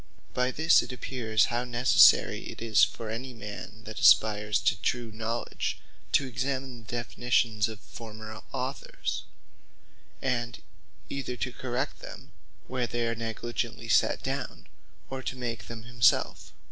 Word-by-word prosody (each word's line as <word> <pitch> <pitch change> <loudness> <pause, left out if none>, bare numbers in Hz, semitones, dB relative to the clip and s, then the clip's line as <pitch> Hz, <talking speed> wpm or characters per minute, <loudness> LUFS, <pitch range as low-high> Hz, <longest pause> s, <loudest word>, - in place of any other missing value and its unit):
By 125 0 +2
this 160 +5 +5
it 125 - -6
appears 120 -4 0
how 120 +1 +1
necessary 125 0 +5
it - - -8
is 115 -1 +4
for 110 -2 0
any 125 +3 -5
man 105 -2 -8
that - - -7
aspires 105 -1 +5
to - - +3
true 120 0 -1
Knowledge, 115 +2 -3 0.3
to 140 - +4
examine 130 0 -3
the 115 - -17
Definitions 120 -3 +1
of 110 -2 -8
former 110 -1 -9
Authors; 135 +1 -3 0.9
and 120 -3 -1 0.5
either 130 -3 -4
to 125 - -2
correct 130 +3 -3
them, - - -10 0.3
where 125 -2 -2
they 120 0 -1
are 115 - 0
negligently 115 +1 -4
set - - +3
down; - - -4 0.5
or 135 0 -3
to 130 - -4
make 115 -4 -4
them 115 -1 -7
himselfe. 120 0 +2
120 Hz, 140 wpm, -29 LUFS, 110-125 Hz, 0.9 s, this